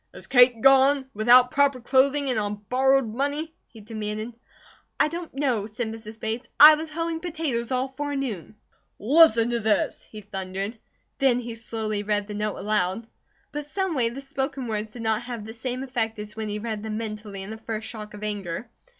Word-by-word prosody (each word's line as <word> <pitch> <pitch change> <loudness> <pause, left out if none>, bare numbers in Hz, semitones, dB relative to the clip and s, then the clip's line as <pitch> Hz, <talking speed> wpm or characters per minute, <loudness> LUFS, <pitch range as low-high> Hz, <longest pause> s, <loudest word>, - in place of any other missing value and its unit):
"Is - - -5
Kate 245 -3 +5
gone? 270 0 +5
Without 245 +4 +6
proper 280 -2 +3
clothing 275 +3 +2
and 235 - 0
on 205 0 -4
borrowed 265 0 +3
money," 285 +5 -2
he 225 - -14
demanded. 215 +1 -5 0.7
"I - - +5
don't 335 +1 -6
know," 255 -7 -1
said 220 +1 -4
Mrs. 220 0 -9
Bates. 225 +3 -3
"I 305 +1 +12
was 315 +1 -3
hoeing 330 +1 -3
potatoes 310 -9 -3
all 255 0 0
forenoon." 270 - -4 0.4
"Listen 240 -2 +5
to 235 - 0
this," 215 -2 +1
he 215 - -11
thundered. 195 +2 -5 0.4
Then 260 -3 +3
he 235 -1 -6
slowly 220 -2 -3
read 205 0 0
the 210 - -7
note 210 0 -2
aloud. 205 +1 0 0.5
But 295 0 -5
someway 310 -9 0
the 255 +4 -7
spoken 270 -1 -3
words 215 -1 -3
did 230 +2 -9
not 220 0 +1
have 240 -3 -6
the 220 - -8
same 250 +2 -4
effect 230 -4 -2
as 210 0 -7
when 220 -1 -4
he 205 - -3
read 215 -1 -4
them 215 0 -4
mentally 210 -3 -6
in 200 - -8
the 220 - -6
first 220 0 -5
shock 210 -2 -8
of 210 - -10
anger. 205 +1 -4
230 Hz, 185 wpm, -25 LUFS, 215-270 Hz, 0.7 s, I